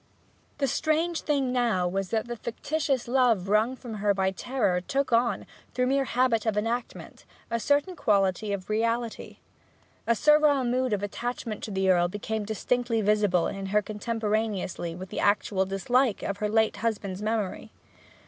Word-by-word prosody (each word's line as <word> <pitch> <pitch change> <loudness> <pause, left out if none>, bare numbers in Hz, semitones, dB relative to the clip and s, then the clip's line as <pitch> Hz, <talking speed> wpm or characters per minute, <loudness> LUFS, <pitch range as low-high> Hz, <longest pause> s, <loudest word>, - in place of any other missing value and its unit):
The 280 - +1
strange 320 +5 0
thing 275 -4 0
now 230 -8 +1
was 195 +1 -2
that 225 0 -1
this 240 -2 -6
fictitious 270 +2 -2
love 240 -7 +2
wrung 215 +5 +2
from 245 -3 -9
her 205 -1 +2
by 190 0 +1
terror 190 -3 0
took 270 +6 -1
on, 235 +1 +2 0.3
through 250 - +2
mere 270 +1 +1
habit 235 -2 +1
of 215 -2 +1
enactment, 230 +3 -3 0.3
a 230 - 0
certain 290 - +1
quality 200 - +1
of 195 -2 -4
reality. 230 +2 -2 0.7
A 235 - +4
servile 300 +1 +4
mood 250 +1 0
of 205 -1 -1
attachment 230 +1 -4
to - - -7
the 190 -1 0
Earl 175 -2 +4
became 210 +3 -4
distinctly 230 +2 0
visible 205 -4 +2
in 195 0 -4
her 210 +2 +2
contemporaneously 210 -5 -2
with 185 +1 -9
an - - -2
actual 200 -2 +1
dislike 230 +4 +1
for - - -2
her 210 - 0
late 220 0 +2
husband's 205 -4 -2
memory. 215 -3 -2
220 Hz, 160 wpm, -27 LUFS, 200-250 Hz, 0.7 s, A